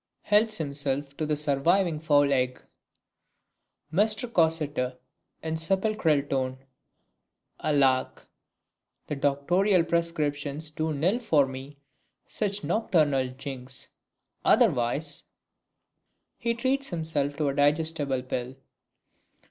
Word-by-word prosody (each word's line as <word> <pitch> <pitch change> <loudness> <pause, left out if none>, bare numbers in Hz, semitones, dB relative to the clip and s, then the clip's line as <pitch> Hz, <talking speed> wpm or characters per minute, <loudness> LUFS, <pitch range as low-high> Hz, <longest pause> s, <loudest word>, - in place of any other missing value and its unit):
[Helps 215 +1 +3
himself 140 -2 -2
to 155 - -2
the 150 -1 0
surviving 155 +4 +1
fowl 145 -3 +3
egg. 125 -1 0 1.3
Mr 215 +6 +2
Cossetter 155 - 0 0.5
(in 160 0 -2
sepulchral 185 -3 +2
tone). 130 -2 -2 1.0
Alack! 135 -3 +1 0.8
that 140 -2 -5
doctorial 175 +7 +2
prescriptions 155 -3 -1
do 155 +1 -2
nill 170 - +1
for 155 - +3
me 135 +2 -9 0.5
such 205 -1 -2
nocturnal 150 - +1
jinks; 130 -1 -7 0.5
otherwise 140 +5 +2 1.2
[_He 235 -1 0
treats 270 +3 0
himself 155 -4 -1
to 150 -2 +1
a - - -1
digestible 145 -2 +1
pill. 125 0 -4
150 Hz, 95 wpm, -27 LUFS, 140-170 Hz, 1.3 s, Helps